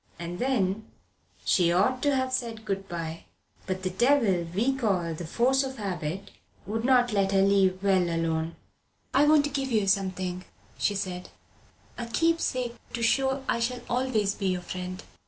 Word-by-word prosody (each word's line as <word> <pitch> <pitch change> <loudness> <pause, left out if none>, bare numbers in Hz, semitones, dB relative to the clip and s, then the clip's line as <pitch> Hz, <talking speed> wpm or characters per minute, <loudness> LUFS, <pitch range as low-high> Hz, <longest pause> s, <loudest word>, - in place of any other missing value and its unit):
And 175 +1 -6
then 220 -5 0 0.6
she 175 -2 +3
ought 205 +9 +2
to 285 -1 +2
have 260 0 0
said 230 -4 -3
good 195 -1 -3
bye. 165 -1 -5 0.4
But 185 0 -3
the 185 - -1
devil 215 -6 +3
we 235 +9 +1
call 190 -10 0
the 160 +1 -6
force 260 +9 +2
of 265 0 -5
habit 190 -2 -4 0.3
would 225 +2 -3
not 245 -2 +4
let 195 -1 +2
her 195 0 +5
leave 195 -1 +3
well 190 -3 +3
alone. 165 0 -1 0.6
"I 275 +3 +5
want 300 -1 +5
to 290 - -2
give 270 -1 -2
you 215 -3 +2
something," 185 -2 0 0.4
she 205 - +1
said; 180 -2 -4 0.7
"a 235 - -4
keepsake, 255 -4 0 0.2
to 235 - -2
show 265 +3 +2
I - - +1
shall 245 +1 -1
always 240 -5 +1
be 195 - -3
your 185 -1 0
friend. 185 +1 -6
200 Hz, 170 wpm, -27 LUFS, 185-255 Hz, 0.7 s, her